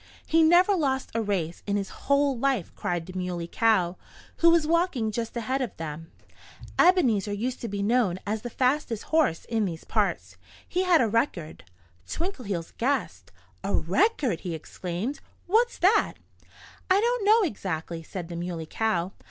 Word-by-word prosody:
"He 325 0 +3
never 350 +5 +5
lost 270 -6 -1
a 230 - 0
race 185 -6 -2
in 200 - 0
his 200 -1 -2
whole 280 0 +1
life!" 250 -6 0
cried 175 -2 -2
the 185 - -10
Muley 180 -2 -3
Cow, 185 -4 +2 0.4
who 335 - +6
was 335 -2 +4
walking 320 -9 +1
just 230 +2 -4
ahead 260 +4 -1
of 250 - -4
them. 160 0 -6 0.7
"Ebenezer 250 - +4
used 240 +5 -3
to 235 - -3
be 200 -1 -3
known 215 -4 +2
as 210 +1 -2
the 240 - -5
fastest 255 -2 0
horse 310 - +1
in 225 -2 0
these 165 -4 -5
parts. 170 - -1 0.3
He 365 +1 0
had 350 -3 +5
a 235 - +3
record." 205 - -2 0.4
Twinkleheels 230 - -4
gasped. 275 +4 -1 0.3
"A - - 0
record!" 285 - +1
he 175 -3 -4
exclaimed. 180 - -5 0.3
"What's 460 +6 +2
that?" 415 +4 +3 0.7
"I 375 +1 +5
don't 475 +1 +1
know, 435 +2 +5
exactly," 170 - -4
said 170 +1 -7
the 170 - -7
Muley 170 -1 -4
Cow. 185 -1 -1
225 Hz, 160 wpm, -26 LUFS, 180-300 Hz, 0.7 s, who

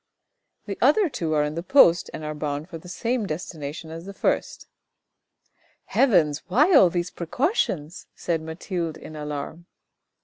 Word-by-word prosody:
"The - - -5
other 415 -5 +4
two 170 - -2
are 150 - +3
in 150 0 -2
the 165 - -3
post 175 -5 +5
and 155 - -7
are 150 0 -3
bound 150 0 -4
for 165 - -7
the 180 - -13
same 230 +4 -1
destination 155 -1 -6
as 165 +2 -8
the 200 - -8
first." - - -1 0.7
" - - -40
Heavens, 170 - +4
why 295 - +4
all 195 - +7
these 175 +1 -2
precautions? 175 - -2
" - - -50
said 165 -2 -2
Mathilde 165 0 -4
in 155 - -10
alarm. 150 +3 -6
170 Hz, 165 wpm, -24 LUFS, 155-190 Hz, 0.7 s, all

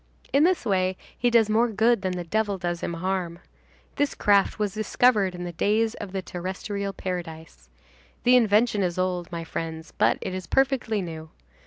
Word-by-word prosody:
In 280 +2 +5
this 365 -7 +1
way 185 -3 +1 0.2
he 245 - +1
does 230 -2 +4
more 225 +3 +3
good 225 0 +2
than 185 -2 -1
the 180 -1 -4
devil 205 +3 -1
does 175 -1 -3
him 170 - -3
harm. 180 -1 -2 0.6
This 290 -1 0
craft 200 -2 +3
was 210 -3 -1
discovered 215 -3 +2
in 175 - -6
the 175 - -4
days 215 +6 +1
of 190 - -8
the 190 -1 -3
terrestrial 190 +3 -4
paradise. 165 - -7 0.5
The 250 +1 +5
invention 220 -2 +3
is 180 -2 -1
old, 180 -1 -1
my 170 -1 -4
friends, 160 -1 -6
but - - +2
it 185 - -4
is 185 -1 -5
perfectly 255 -6 +1
new. 160 -2 -7
195 Hz, 180 wpm, -25 LUFS, 175-220 Hz, 0.6 s, In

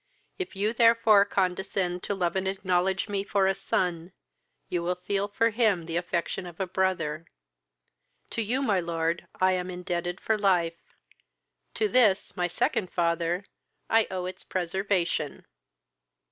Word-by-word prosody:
If 370 - -4
you 210 +3 0
therefore 230 -3 +5
condescend 185 -2 -1
to 200 - -1
love 175 -2 -1
and 190 0 0
acknowledge 190 0 0
me 200 -2 -1
for 200 -1 +1
a 190 - +3
son, 180 -2 -2 0.5
you 175 - -1
will 180 +1 -1
feel 195 +3 -1
for 230 +3 +1
him 210 -7 +2
the 165 0 -4
affection 175 +1 -2
of 175 +1 -11
a 190 - 0
brother. 175 -4 -1 1.0
To - - -1
you, 245 +6 0
my 205 -7 +2
lord, 170 -1 -2
I 185 0 +4
am 180 0 -1
indebted 175 0 -3
for 220 -1 0
life, 175 -4 0 0.8
to 430 - +2
this, 225 - +3
my 180 -2 0
second 180 +2 0
father, 170 +2 0 0.5
I 225 0 +4
owe 185 -1 -3
its 185 - -7
preservation." 180 -4 -1
185 Hz, 145 wpm, -27 LUFS, 175-200 Hz, 1.0 s, therefore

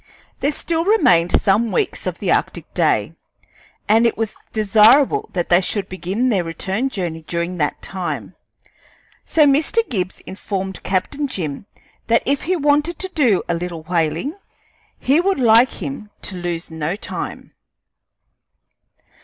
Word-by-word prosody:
There 285 - +1
still 325 +2 -2
remained 180 - +4
some 215 +3 +2
weeks 425 - -1
of - - -3
the - - -1
arctic - - -1
day, - - +1 0.7
and 225 +2 +5
it 230 - -2
was 225 -1 -2 0.2
desirable 220 +6 +4
that 175 -2 -2
they 175 +1 +5
should 195 +1 -2
begin 190 +7 -1
their 195 -7 +1
return 190 +9 -2
journey 170 -8 -4
during 170 +1 -2
that 150 -3 -2
time; 185 -2 -4 0.9
so 310 -2 +4
Mr. 310 +11 +2
Gibbs 185 -6 -3
informed 190 0 -5
Captain 280 +10 -1
Jim 175 - -5 0.4
that 230 0 +3
if 280 +1 0
he 370 +3 +1
wanted 295 +1 +1
to 375 - -4
do 255 - +2
a 170 - 0
little 170 -1 -4
whaling, 165 - -1 0.6
he 280 +6 +2
would 390 -3 0
like 235 +1 +5
him 270 -7 -6
to 195 - -4
lose 175 -2 -4
no 160 +2 -2
time. 210 - -6
210 Hz, 145 wpm, -20 LUFS, 175-275 Hz, 0.9 s, and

